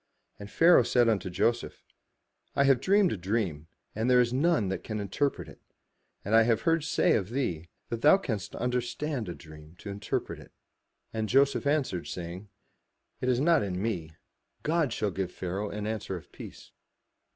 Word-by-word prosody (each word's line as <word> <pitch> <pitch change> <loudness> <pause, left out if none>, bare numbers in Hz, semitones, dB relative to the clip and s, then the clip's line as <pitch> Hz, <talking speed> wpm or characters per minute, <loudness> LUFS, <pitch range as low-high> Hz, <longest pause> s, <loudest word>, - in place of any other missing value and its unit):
And 100 0 -9
Pharaoh 165 +5 +6
said 120 0 +2
unto 100 -5 0
Joseph, 115 +7 -1 0.7
"I 140 - +4
have 135 -3 +4
dreamed 195 +1 +3
a - - -2
dream, 90 -5 -2 0.3
and 110 +4 -1
there 125 -1 +6
is 120 0 +2
none 140 - +2
that 95 - -4
can 110 -1 -4
interpret 140 +8 -2
it: - - -14 0.6
and 105 - -2
I 115 - +7
have 115 -1 +2
heard 165 -1 +2
say 165 - +2
of 100 -2 0
thee, 90 - -3 0.2
that 115 -1 -4
thou 150 +6 +7
canst 105 - -4
under 125 +1 0
stand 125 - -4
a 85 - -5
dream 80 0 -14
to 100 - -8
interpret 100 0 -4
it.'' - - -15 0.6
And 110 -1 -2
Joseph 140 +2 +3
answered, 140 - 0
saying, 90 +3 -7 0.7
'*It 130 - -1
is 125 -1 +2
not 165 +2 +4
in 90 -3 -3
me: 90 -7 -3 0.5
God 155 -4 +1
shall 105 -3 -1
give 95 -1 -3
Pharaoh 95 +3 -4
an 105 0 -5
answer 110 -3 -3
of 80 - -14
peace." - - -11
110 Hz, 180 wpm, -28 LUFS, 95-135 Hz, 0.7 s, I